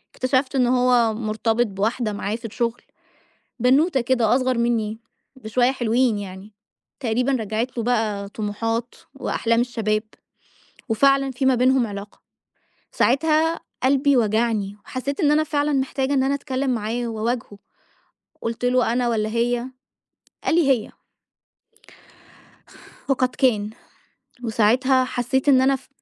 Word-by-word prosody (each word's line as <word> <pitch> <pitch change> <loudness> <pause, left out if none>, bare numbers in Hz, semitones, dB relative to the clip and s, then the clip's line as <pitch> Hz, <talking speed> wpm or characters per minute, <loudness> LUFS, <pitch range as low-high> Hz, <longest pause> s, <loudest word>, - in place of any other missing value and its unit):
اكتشفت 260 +1 0
إن 250 -2 +3
هو 245 -3 +3
مرتبط 225 +1 0
بواحدة 215 +3 -2
معاه 205 +1 -3
في 235 - -12
الشغل، 235 +2 -2 0.8
بنوتة 270 +4 +3
كده 240 -2 +2
أصغر 255 -2 +1
مني 225 -2 0 0.4
بشوية 245 +2 +1
حلوين 240 -3 +1
يعني، 195 +1 -9 0.5
تقريبًا 250 +3 0
رجّعِت 230 +1 -2
له 230 - -1
بقى 215 -4 -1
طموحات 225 +3 -3 0.2
وأحلام 230 0 0
الشباب، 220 -3 -1 0.9
وفعلًا 275 +4 +3
في 260 +1 -1
ما 260 - +5
بينهم 255 0 +3
علاقة، 200 -1 -9 0.7
ساعتها 320 - +2 0.2
قلبي 275 0 +3
وجعني، 215 -2 0
وحسّيت 275 +2 -4
إن 295 -1 +4
أنا 310 +1 +3
فعلًا 295 -1 0
محتاجة 270 0 0
إن 265 -2 +2
أنا 275 +1 +1
أتكلّم 275 -1 -3
معاه 235 +1 -2
وأواجهه، 225 -2 -3 0.8
قُلت 230 +2 -3
له: 250 -2 +2
"أنا 245 -1 +1
والّا 215 -2 0
هي؟" 235 +2 0 0.8
قال - - +1
لي: 325 -5 +3
"هي." 235 -5 0 2.2
وقد 255 -1 +2
كان. 215 -6 +1 0.7
وساعتها 245 +4 +3
حسّيت 260 +3 -1
إن 260 -1 +6
أنا 270 +1 +3
ف 265 0 -12
245 Hz, 125 wpm, -22 LUFS, 220-265 Hz, 2.2 s, إن